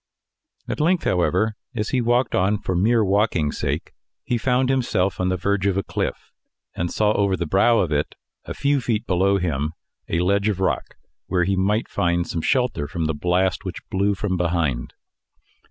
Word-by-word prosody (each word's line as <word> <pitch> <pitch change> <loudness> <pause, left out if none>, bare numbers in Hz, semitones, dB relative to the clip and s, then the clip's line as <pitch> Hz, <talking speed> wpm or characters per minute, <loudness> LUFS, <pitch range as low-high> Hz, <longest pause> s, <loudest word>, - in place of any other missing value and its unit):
At - - -3
length, 170 +3 +2
however, 95 +4 +1 0.2
as 105 -2 -2
he 130 - +1
walked 120 +1 +1
on 95 +3 +2
for 95 -2 -3
mere 110 +4 +3
walking's 95 -7 +1
sake, - - -2 0.3
he 120 - -1
found 125 +2 +1
himself 120 -8 0
on 90 0 +1
the 95 - 0
verge 100 +1 0
of 95 -1 +1
a 100 - 0
cliff, - - -4 0.4
and 85 0 -2
saw, 105 -1 +2
over 100 -3 +1
the 85 - -2
brow 100 +8 +3
of 85 -7 +1
it, 75 0 -1 0.3
a - - -6
few 140 0 +1
feet 115 -2 -1
below 95 0 +2
him, 80 -4 -1 0.4
a 85 - +1
ledge 100 +3 +2
of 100 -3 -2
rock, 95 -2 -1 0.3
where 90 -2 +1
he 95 +3 +1
might 105 +4 +1
find 85 0 0
some 85 - -3
shelter 125 - 0
from 85 0 -3
the 80 - 0
blast, 90 +5 0
which 95 -3 -7
blew 100 +1 +1
from 95 -1 -2
behind. 85 -8 -1
95 Hz, 185 wpm, -22 LUFS, 90-110 Hz, 0.4 s, mere